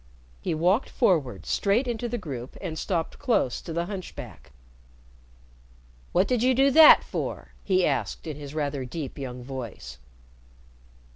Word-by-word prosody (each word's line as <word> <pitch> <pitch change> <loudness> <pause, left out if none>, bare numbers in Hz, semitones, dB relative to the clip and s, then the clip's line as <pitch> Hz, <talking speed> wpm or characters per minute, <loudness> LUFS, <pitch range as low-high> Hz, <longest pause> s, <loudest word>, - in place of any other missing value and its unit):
He - - -1
walked 180 - +2
forward 140 - +1
straight 215 +6 +1
into 240 0 -2
the 240 - -2
group 135 - -7
and 170 -5 -5
stopped 170 -5 -2
close 230 - +1
to - - -8
the 170 +1 -1
hunchback. 185 - -8 1.6
"What 185 +3 +3
did 250 -3 +1
you 255 +1 +3
do 270 +2 +4
that 315 +2 +9
for?" - - -5
he 185 -2 +2
asked, 140 -3 -2
in 155 -3 -5
his 145 0 -9
rather 145 -3 -2
deep 140 +2 -6
young 125 -2 -6
voice. 115 - -7
165 Hz, 145 wpm, -26 LUFS, 135-215 Hz, 1.6 s, that